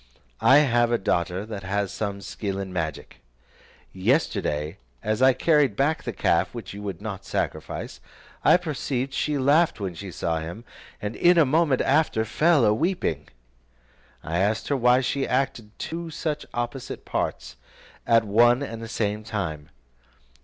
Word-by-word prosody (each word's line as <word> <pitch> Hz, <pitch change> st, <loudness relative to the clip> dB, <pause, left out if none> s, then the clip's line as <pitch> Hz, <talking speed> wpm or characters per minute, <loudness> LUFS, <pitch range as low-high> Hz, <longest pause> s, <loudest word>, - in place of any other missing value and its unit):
I 125 Hz, +5 st, +7 dB
have 120 Hz, -2 st, +2 dB
a 120 Hz, -, +3 dB
daughter 90 Hz, 0 st, -1 dB
that 105 Hz, -3 st, -6 dB
has 100 Hz, 0 st, -2 dB
some 100 Hz, -2 st, -3 dB
skill 100 Hz, 0 st, -4 dB
in 95 Hz, -1 st, -5 dB
magic. 80 Hz, -4 st, -4 dB, 0.8 s
Yesterday, 95 Hz, -, 0 dB, 0.3 s
as 110 Hz, +2 st, -1 dB
I 130 Hz, 0 st, +6 dB
carried 150 Hz, -7 st, +3 dB
back 145 Hz, +6 st, +1 dB
the -, -, -4 dB
calf -, -, +1 dB
which 100 Hz, -6 st, -7 dB
you 100 Hz, -, -8 dB
would 100 Hz, -2 st, -6 dB
not 105 Hz, -4 st, -5 dB
sacrifice, -, -, -4 dB, 0.4 s
I -, -, +6 dB
perceived 140 Hz, -5 st, -3 dB
she 150 Hz, 0 st, 0 dB
laughed 145 Hz, +4 st, +3 dB
when 95 Hz, -3 st, -3 dB
she 95 Hz, +3 st, -8 dB
saw 80 Hz, -2 st, -2 dB
him, 85 Hz, +9 st, -7 dB, 0.4 s
and 105 Hz, +2 st, -3 dB
in 175 Hz, 0 st, +4 dB
a 165 Hz, -, +6 dB
moment 145 Hz, -1 st, +2 dB
after 135 Hz, -6 st, +2 dB
fell 150 Hz, +4 st, +3 dB
a 105 Hz, -, +4 dB
weeping. 110 Hz, -, -1 dB, 1.0 s
I 85 Hz, +2 st, -2 dB
asked 105 Hz, +3 st, 0 dB
her 145 Hz, -, +2 dB
why 125 Hz, 0 st, +4 dB
she 135 Hz, +1 st, -1 dB
acted 125 Hz, -4 st, -1 dB
two 170 Hz, +1 st, -5 dB
such 155 Hz, -1 st, -3 dB
opposite 120 Hz, +2 st, -5 dB
parts 65 Hz, -, -3 dB, 0.5 s
at 115 Hz, -1 st, +5 dB
one 120 Hz, +5 st, +4 dB
and 115 Hz, -4 st, -6 dB
the 115 Hz, -, -6 dB
same 105 Hz, -1 st, -2 dB
time. 80 Hz, -9 st, -4 dB
115 Hz, 160 wpm, -25 LUFS, 100-140 Hz, 1.0 s, I